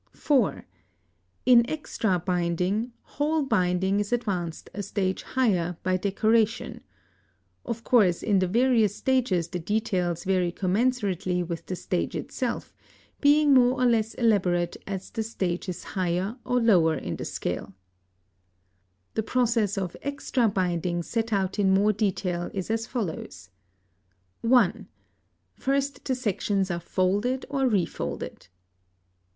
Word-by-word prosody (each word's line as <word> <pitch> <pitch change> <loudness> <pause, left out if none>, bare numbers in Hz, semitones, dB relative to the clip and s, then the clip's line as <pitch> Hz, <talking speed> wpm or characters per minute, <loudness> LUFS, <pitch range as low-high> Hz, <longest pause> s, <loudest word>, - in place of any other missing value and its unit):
(4) 285 -4 +1 0.8
In 245 -2 +7
extra 225 -10 -1
binding, 180 +5 -1
whole 305 +1 -1
binding 190 -3 +1
is 205 +1 -2
advanced 190 -9 -2
a 205 - -4
stage 190 -1 -2
higher 180 -10 0
by 185 0 +1
decoration. 220 +4 +1 0.8
Of 230 -1 -5
course 200 -10 +3
in 200 -3 +3
the 185 - +1
various 230 0 +3
stages 230 -12 +1
the 180 - -4
details 180 -3 -1
vary 185 -2 +1
commensurately 190 -4 0
with 170 -1 -5
the 185 - -3
stage - - -2
itself, - - -4 0.5
being 290 0 +5
more 255 0 +4
or 255 - +3
less 225 -2 +2
elaborate 185 -7 +2
as 195 -1 -5
the 225 - -3
stage 190 -5 -3
is 180 - -5
higher 185 +3 -2
or 250 - +1
lower 175 -9 +4
in - - -4
the - - -5
scale. 100 - -4 1.4
The - - 0
process 225 -3 +1
of 185 -3 -3
extra 280 -3 0
binding 175 -3 -1
set 225 +4 -2
out 195 0 0
in 190 -1 +4
more 210 +2 +3
detail 185 -4 -1
is 190 +2 -3
as 225 0 -1
follows: 160 - -5 0.9
(1) 235 -4 +3 0.7
First 275 +1 -1
the 260 - 0
sections 200 -4 -1
are 170 - -2
folded 200 +9 0
or 270 -2 +1
refolded. 170 - -2
200 Hz, 130 wpm, -26 LUFS, 180-235 Hz, 1.4 s, In